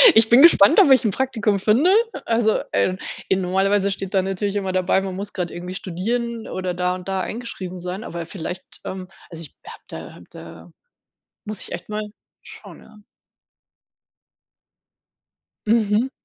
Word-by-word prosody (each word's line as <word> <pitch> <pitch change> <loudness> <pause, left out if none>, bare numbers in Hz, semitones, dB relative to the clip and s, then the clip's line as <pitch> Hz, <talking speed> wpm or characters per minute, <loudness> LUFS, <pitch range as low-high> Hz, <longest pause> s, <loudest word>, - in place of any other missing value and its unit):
Ich 220 0 +6
bin 240 +3 +7
gespannt, 325 - +7
ob 350 -9 +6
ich 260 - +6
'n 215 - +1
Praktikum 220 -4 0
finde. 225 - +3 0.4
Also 225 -1 +2
äh, 185 - +1 0.3
in 190 0 +2
normalerweise 195 +2 +1
steht 195 0 -5
da 190 - +3
natürlich 195 +2 -2
immer 195 -2 -1
dabei, 185 +1 +2
man 190 -1 -5
muss 200 +2 -6
grade 175 -2 -3
irgendwie 180 +1 -6
studieren 225 +6 -3
oder 185 -1 -3
da 180 +1 -1
und 185 0 -10
da 190 -1 -1
eingeschrieben 190 -5 -6
sein, 180 +4 -5
aber 170 -1 -6
vielleicht 175 +1 -6 0.2
ähm, 185 -1 -6 0.2
also 165 -1 -8
ich 150 - -14
habe 460 - -10
da - - -8
habe - - -15
da - - -12 0.7
muss 215 -2 -3
ich - - -5
echt 175 - -7
mal 215 0 -3 0.4
schauen, - - -13
ja. 215 - -18 2.7
Mhm. 220 +2 +2
195 Hz, 165 wpm, -22 LUFS, 185-220 Hz, 2.7 s, bin